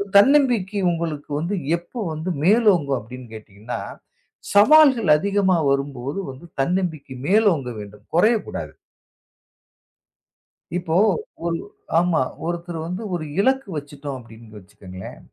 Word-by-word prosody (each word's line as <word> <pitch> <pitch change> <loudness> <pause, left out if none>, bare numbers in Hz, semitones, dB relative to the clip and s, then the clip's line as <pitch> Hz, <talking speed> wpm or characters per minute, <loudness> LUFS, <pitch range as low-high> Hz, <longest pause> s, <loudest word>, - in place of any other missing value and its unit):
தன்னம்பிக்கை 230 -4 +4
உங்களுக்கு 165 -4 -4
வந்து 170 +6 -2 0.2
எப்போ 175 +8 -10
வந்து 155 +4 -4
மேலோங்கும் 185 - +4
அப்படின்னு 125 +3 -10
கேட்டீங்கன்னா, 110 +2 -7 0.7
சவால்கள் 255 - +6
அதிகமா 195 +1 +2
வரும்போது 140 +2 -2
வந்து 130 +6 -13
தன்னம்பிக்கை 155 -4 -1
மேலோங்க 190 - +3
வேண்டும். 105 0 -11
குறையக் 215 +5 +3
கூடாது. - - -6 2.0
இப்போ 175 -2 -1 0.5
ஒரு 170 -1 0 0.4
ஆமா, 170 -3 +3 0.2
ஒருத்தரு 170 0 -4
வந்து, 180 +5 -4
ஒரு 155 - -4
இலக்கு 265 +2 +2
வச்சுட்டோம் 145 -1 -6
அப்படின்னு 110 -2 -14
வச்சுக்கங்களேன். 95 -1 -11
165 Hz, 105 wpm, -22 LUFS, 135-200 Hz, 2.0 s, சவால்கள்